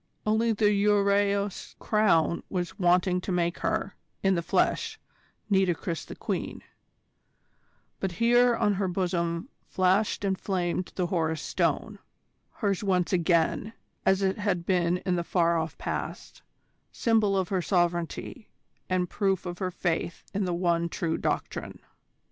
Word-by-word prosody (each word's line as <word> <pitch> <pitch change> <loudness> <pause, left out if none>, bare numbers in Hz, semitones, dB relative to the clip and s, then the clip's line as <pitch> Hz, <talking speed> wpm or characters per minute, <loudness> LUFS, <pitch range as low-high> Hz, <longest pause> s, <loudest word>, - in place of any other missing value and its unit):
Only 220 +2 +2
the 210 -1 +3
Ureaus 200 -1 +1
Crown 180 -7 +2
was 180 0 -3
wanting 180 0 +3
to 190 - -4
make 175 -1 0
her, - - -1 0.3
in 195 0 +4
the 170 - 0
flesh, 165 - 0 0.5
Nitocris 190 -3 0
the - - -9
Queen: - - -4 1.4
but 190 -2 -2
here 240 +4 +4
on 205 -2 +2
her 195 0 -1
bosom 175 -1 -1 0.2
flashed 190 +3 +1
and 190 -1 0
flamed 180 -2 -2
the 180 - 0
Horus 160 -3 -1
Stone - - -1 0.5
hers 200 -3 -1
once 185 -2 +1
again, 175 +5 +1 0.3
as 190 +1 +3
it 190 +1 0
had 190 -5 -1
been 180 -1 +2
in 180 -2 +1
the 170 - -1
far 170 -1 +2
off 160 0 -4
past, - - -5 0.5
symbol 220 -4 +2
of 185 -2 0
her 190 -2 0
sovereignty, 175 +5 -1 0.4
and 185 -1 +1
proof 195 -1 0
of 175 0 -5
her 185 -2 -1
faith 170 -1 -2
in 200 0 0
the 180 - -1
one 170 -1 +1
true 165 -1 -1
Doctrine. - - -3
185 Hz, 140 wpm, -27 LUFS, 175-200 Hz, 1.4 s, in